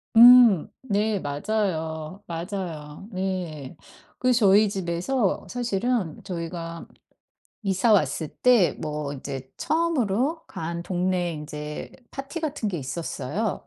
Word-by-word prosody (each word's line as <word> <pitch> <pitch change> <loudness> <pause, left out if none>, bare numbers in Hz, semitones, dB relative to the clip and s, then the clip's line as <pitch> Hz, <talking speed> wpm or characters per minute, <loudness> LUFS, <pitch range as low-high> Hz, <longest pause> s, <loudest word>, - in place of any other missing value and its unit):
음. 235 -6 +9
네 210 -3 0
맞아요, 160 +1 -2
맞아요. 170 -2 -5
네. 180 -7 -4 0.4
그래서 250 -1 +3
저희 205 +2 +6
집에서 190 +4 -1
사실은 240 -6 -1
저희가 170 -2 -5 0.8
이사 195 +3 +2
왔을 155 -5 +2
때 240 -4 +4
뭐 150 -2 -3
인제 135 -1 -6
처음으로 310 - 0
간 170 +1 -5
동네 180 -1 0
인제 150 0 -6 0.2
파티 275 +5 -6
같은 295 -8 -2
게 190 - -3
있었어요. 155 - -3
185 Hz, 215 characters per minute, -25 LUFS, 160-220 Hz, 0.8 s, 음